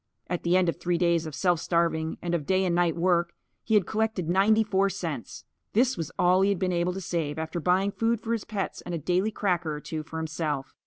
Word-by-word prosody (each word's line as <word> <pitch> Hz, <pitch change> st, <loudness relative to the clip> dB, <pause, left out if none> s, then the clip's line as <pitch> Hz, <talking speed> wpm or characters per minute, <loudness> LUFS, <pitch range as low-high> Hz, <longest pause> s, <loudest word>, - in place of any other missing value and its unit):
At 175 Hz, -1 st, -3 dB
the 175 Hz, +2 st, +3 dB
end 185 Hz, -1 st, +3 dB
of 170 Hz, -, 0 dB
three 175 Hz, -1 st, 0 dB
days 170 Hz, -2 st, +2 dB
of 155 Hz, -, -7 dB
self 175 Hz, -3 st, +2 dB
starving 165 Hz, -2 st, 0 dB
and 175 Hz, 0 st, -2 dB
of 155 Hz, -4 st, -1 dB
day 190 Hz, 0 st, +2 dB
and 175 Hz, -, +1 dB
night 175 Hz, -2 st, +2 dB
work, 170 Hz, 0 st, +1 dB, 0.3 s
he 220 Hz, -, +1 dB
had 205 Hz, -4 st, +4 dB
collected 220 Hz, -5 st, -1 dB
ninety 200 Hz, +5 st, +4 dB
four 195 Hz, -2 st, +1 dB
cents. 165 Hz, -9 st, -5 dB, 0.3 s
This 245 Hz, +4 st, +3 dB
was 165 Hz, -1 st, -4 dB
all 180 Hz, +1 st, +4 dB
he 195 Hz, -, +4 dB
had 200 Hz, -, +1 dB
been 180 Hz, 0 st, 0 dB
able 175 Hz, +1 st, 0 dB
to 195 Hz, -, -5 dB
save 160 Hz, -4 st, -2 dB
after 160 Hz, +2 st, -3 dB
buying 185 Hz, +4 st, +2 dB
food 230 Hz, +2 st, 0 dB
for 230 Hz, +1 st, -2 dB
his 230 Hz, -, -2 dB
pets 205 Hz, -3 st, -4 dB
and 175 Hz, -, -5 dB
a -, -, -1 dB
daily 180 Hz, +6 st, +1 dB
cracker 175 Hz, -7 st, -1 dB
or -, -, -5 dB
two 155 Hz, +1 st, -5 dB
for 160 Hz, +1 st, -8 dB
himself. 155 Hz, -4 st, -3 dB
175 Hz, 245 wpm, -27 LUFS, 165-195 Hz, 0.3 s, had